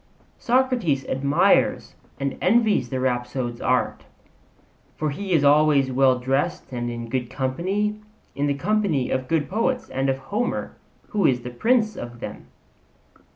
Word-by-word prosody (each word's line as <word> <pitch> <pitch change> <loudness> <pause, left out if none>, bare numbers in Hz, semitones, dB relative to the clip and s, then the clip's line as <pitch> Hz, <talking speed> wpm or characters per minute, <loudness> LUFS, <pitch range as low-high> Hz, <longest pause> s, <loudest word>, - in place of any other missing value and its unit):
Socrates 240 - +1
admires 140 +2 +2 0.3
and 140 0 -2
envies 210 - +3
the 130 - -2
rhapsode's 120 -1 -2
art; - - 0 0.9
for 155 -1 -1
he 190 +7 -5
is 160 -5 +3
always 145 -2 +4
well 130 0 +4
dressed 135 +8 -1
and 120 -1 -3
in 120 0 -5
good 125 0 -2
company 185 +12 -1 0.4
in 145 +1 -1
the 140 - 0
company 180 -5 0
of 130 -1 -1
good 160 -1 0
poets 230 +6 -1
and 135 +1 -1
of 135 - +1
Homer, 210 - -3 0.3
who 205 -5 +2
is 125 -2 +1
the 125 +1 -7
prince 220 - +1
of 120 -6 -8
them. - - -8
140 Hz, 145 wpm, -23 LUFS, 130-200 Hz, 0.9 s, always